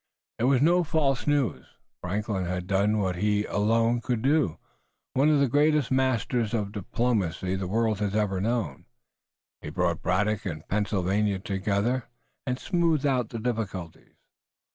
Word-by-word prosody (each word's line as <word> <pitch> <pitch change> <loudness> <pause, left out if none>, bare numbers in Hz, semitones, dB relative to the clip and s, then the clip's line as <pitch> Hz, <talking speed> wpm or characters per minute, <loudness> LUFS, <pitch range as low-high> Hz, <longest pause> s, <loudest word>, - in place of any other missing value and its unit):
It 115 - +2
was 135 0 +4
no 175 +3 +4
false 145 -5 0
news. 145 -4 +1 0.4
Franklin 100 0 -2
had 90 0 -3
done 100 +3 +2
what 95 -4 -1
he 105 +2 +1
alone 115 +3 +1
could 120 -3 -2
do. 140 - +2 0.6
One 140 +4 +3
of 150 -2 +4
the 140 - +3
greatest 145 +1 +2
masters 125 -3 +1
of 105 -3 -2
diplomacy 100 -3 -1
the 95 -1 -3
world 110 +1 0
has 105 -1 -1
ever 100 -3 0
known, 110 - -2 0.7
he - - -6
brought 85 +1 -1
Braddock 105 +3 0
and 80 -6 -6
Pennsylvania 100 0 0
together, 100 +6 -1 0.4
and 125 0 0
smoothed 165 -2 +1
out 125 -5 +1
the 115 - -5
difficulties. 110 -7 -4
110 Hz, 145 wpm, -27 LUFS, 95-125 Hz, 0.7 s, was